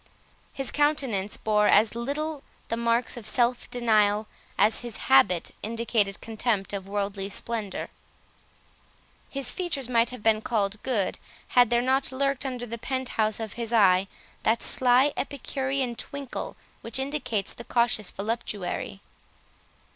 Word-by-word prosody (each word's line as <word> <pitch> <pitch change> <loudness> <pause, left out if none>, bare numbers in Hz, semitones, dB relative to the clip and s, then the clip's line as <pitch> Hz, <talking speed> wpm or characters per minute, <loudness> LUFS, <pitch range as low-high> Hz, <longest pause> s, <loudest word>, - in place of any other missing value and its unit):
His 270 -2 -2
countenance 270 -10 +1
bore 210 -1 +2
as 215 0 +5
little 285 +5 -3 0.3
the 230 - 0
marks 235 +1 +1
of 220 -3 -2
self 240 +2 +1
denial, 215 -3 +2 0.3
as 215 - +4
his 240 -4 -6
habit 165 +6 +4
indicated 220 -3 0
contempt 220 -3 -1
of 195 -1 -4
worldly 200 -1 -2
splendour. 210 -1 -3 1.4
His 275 -2 -2
features 325 -9 -2
might 235 -1 +3
have 250 -4 -9
been 220 -1 +3
called 210 -2 -1
good, 225 -8 0 0.3
had 245 -2 +5
there 240 0 +3
not 265 +1 +1
lurked 275 +1 0
under 250 -2 -4
the 235 0 -6
pent 260 +2 -2
house 215 -1 +1
of 220 -2 -4
his 235 -1 -4
eye, 195 -4 +5 0.3
that 225 +1 +2
sly 260 +3 +4
epicurean 270 -2 -2
twinkle 280 +2 -5 0.3
which 230 +1 -3
indicates 265 -7 -2
the 235 - -9
cautious 235 -4 +1
voluptuary. 205 -3 -3
235 Hz, 135 wpm, -27 LUFS, 210-260 Hz, 1.4 s, as